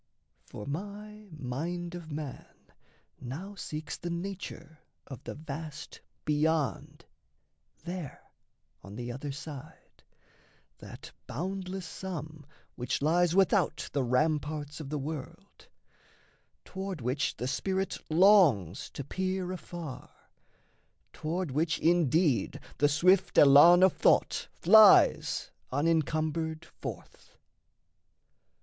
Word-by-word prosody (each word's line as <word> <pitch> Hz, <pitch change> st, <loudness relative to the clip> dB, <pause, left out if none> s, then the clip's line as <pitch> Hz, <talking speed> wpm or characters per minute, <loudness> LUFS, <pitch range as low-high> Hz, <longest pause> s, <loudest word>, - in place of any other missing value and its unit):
For 105 Hz, -, -8 dB
my 210 Hz, +7 st, -7 dB
mind 165 Hz, +5 st, -5 dB
of 170 Hz, -3 st, -8 dB
man 145 Hz, -2 st, -7 dB, 0.6 s
Now 150 Hz, +11 st, -7 dB
seeks 155 Hz, -5 st, -6 dB
the 175 Hz, -, -6 dB
nature 170 Hz, -3 st, -6 dB, 0.3 s
of 135 Hz, -5 st, -10 dB
the -, -, -6 dB
vast 155 Hz, 0 st, -8 dB, 0.2 s
Beyond 150 Hz, -1 st, -1 dB, 0.8 s
There 175 Hz, -4 st, -7 dB, 0.6 s
on 100 Hz, +1 st, -11 dB
the 120 Hz, +1 st, -5 dB
other 140 Hz, +3 st, -5 dB
side, 145 Hz, +2 st, -10 dB, 0.8 s
that -, -, -11 dB, 0.2 s
boundless 185 Hz, +5 st, -4 dB
sum 155 Hz, -5 st, -7 dB, 0.3 s
Which 125 Hz, +2 st, -2 dB
lies 170 Hz, +2 st, +3 dB
without 195 Hz, -2 st, +2 dB
the 140 Hz, -, +1 dB
ramparts 150 Hz, +3 st, -1 dB
of 150 Hz, -3 st, -7 dB
the 150 Hz, -, -2 dB
world, 145 Hz, 0 st, -8 dB, 1.0 s
Toward 190 Hz, -2 st, -5 dB
which 130 Hz, +4 st, -1 dB
the 125 Hz, -, -3 dB
spirit 190 Hz, +7 st, -2 dB
longs 155 Hz, -, +4 dB
to 140 Hz, -, -4 dB
peer 185 Hz, +4 st, -3 dB
afar, 175 Hz, -5 st, -8 dB, 1.0 s
Toward 165 Hz, 0 st, -3 dB
which 155 Hz, +4 st, 0 dB
indeed 165 Hz, -4 st, +2 dB, 0.2 s
the 145 Hz, -, +4 dB
swift 180 Hz, +6 st, +3 dB
elan 150 Hz, +6 st, +8 dB
of 190 Hz, -, +5 dB
thought -, -, +2 dB
Flies 215 Hz, +3 st, +5 dB, 0.2 s
unencumbered 160 Hz, +2 st, 0 dB
forth. -, -, -10 dB
160 Hz, 100 wpm, -30 LUFS, 145-180 Hz, 1.0 s, elan